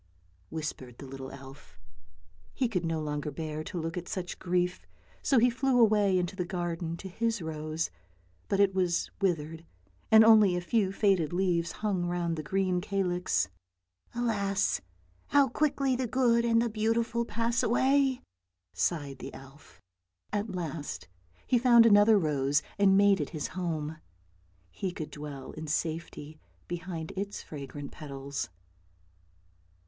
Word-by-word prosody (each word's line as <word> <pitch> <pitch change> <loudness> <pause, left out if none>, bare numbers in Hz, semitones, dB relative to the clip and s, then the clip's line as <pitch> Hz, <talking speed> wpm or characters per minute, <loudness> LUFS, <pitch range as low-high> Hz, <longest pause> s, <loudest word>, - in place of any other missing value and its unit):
" 90 0 -35
whispered 140 -6 -5
the - - -9
little 135 0 -7
elf. 135 - -13 0.8
He 255 - +1
could 185 -6 -2
no 165 -1 -1
longer 150 -1 -3
bear 155 +1 -5
to 175 - -4
look 165 0 -3
at 175 -1 -5
such 180 -2 -5
grief, 180 - -1 0.3
so 270 - +2
he 240 +1 +5
flew 260 +1 +2
away 205 -4 +4
into 180 +1 -1
the 185 - -1
garden 175 -2 -3
to 190 - -8
his 225 +4 -1
rose, 155 -1 -3 0.6
but 195 - +1
it 200 -1 +4
was 180 -2 0
withered, 165 -3 -1 0.5
and 220 0 +8
only 215 -5 +7
a - - -2
few 195 +1 +1
faded 195 -6 +2
leaves 175 -2 +1
hung 185 -4 0
round 175 -1 -1
the 155 - -4
green 185 +2 0
calyx. 180 - 0 0.7
"Alas! 205 -5 0 0.5
how 280 0 +4
quickly 275 -1 +1
the 250 0 -1
good 235 -1 +3
and 230 0 +3
the - - +1
beautiful 230 +2 0
pass 235 +1 0
away! 265 +2 +2 0.3
" - - -55 0.2
sighed 140 - -1
the - - -7
elf. 135 +3 -15 0.5
At 210 +1 -1
last 155 - -5 0.4
he 245 - +3
found 235 -2 +7
another 210 0 +7
rose, 145 -4 +1 0.2
and 195 -1 +5
made 200 -3 +5
it 145 - -3
his 155 -3 -4
home. 160 -4 -3 0.7
He 185 - -3
could 160 -3 -6
dwell 145 -2 -7
in 155 0 -7
safety 155 -1 -3 0.3
behind 170 -2 -5
its 200 +1 -4
fragrant 145 -1 -8
petals. 140 - -5
180 Hz, 150 wpm, -29 LUFS, 155-215 Hz, 0.8 s, and